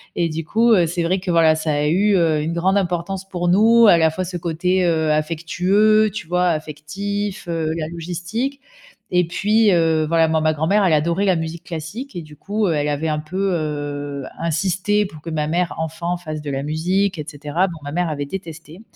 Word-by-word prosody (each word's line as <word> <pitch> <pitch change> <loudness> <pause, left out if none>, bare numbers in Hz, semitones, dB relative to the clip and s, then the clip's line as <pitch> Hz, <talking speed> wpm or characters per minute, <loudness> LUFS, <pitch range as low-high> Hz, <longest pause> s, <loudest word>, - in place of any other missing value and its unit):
Et 170 -1 0
du 160 0 -4
coup, 230 +6 +2
heu, 175 -5 +4
c'est 170 +1 -2
vrai 185 +3 +1
que, 185 - -6
voilà, 165 -2 +4
ça 155 -1 -1
a 145 0 0
eu, 195 +6 +3
heu, 160 -4 +2
une 160 +2 -2
grande 185 +4 +1
importance 185 +1 -2
pour 175 -2 -2
nous, 225 +5 +6
à 175 - +7
la 160 -1 +4
fois 185 +4 -3
ce 180 0 -5
côté, 180 +2 0
heu, 160 -2 +1
affectueux, 180 +8 +2
tu 195 - -6
vois, 180 +1 +1
affectif, 190 +6 -4
heu, 165 -2 -1
la 155 -2 -3
logistique 175 - -4 0.5
et 180 0 +3
puis, 210 +5 +2
heu, 165 -3 +2
voilà, 165 0 +3
moi, 160 0 +1
ma 155 0 +3
grand-mère, 160 +7 +2
elle 180 - +3
adorait 170 +5 +1
la 185 -3 +3
musique 165 +1 -5
classique 180 - -7
et - - -3
du 155 -1 -13
coup, 205 +6 -2
heu, 170 - +1
elle 150 -1 0
avait 145 +2 -1
un 155 -1 -1
peu, 185 +6 -2
heu, 145 -3 -4
insisté 185 +5 0
pour 155 -6 -10
que 165 - -7
ma 155 -2 -1
mère, 175 +2 0
enfant, 165 +2 -3
fasse 155 -3 -6
de 145 -1 -5
la 135 0 -2
musique 180 +6 0
et 150 - -4
cetera. 150 +4 -1
Bon, 170 -3 -7
ma 145 0 -6
mère 175 0 0
avait 145 -2 -3
détesté 165 +1 -8
170 Hz, 215 wpm, -20 LUFS, 155-190 Hz, 0.5 s, à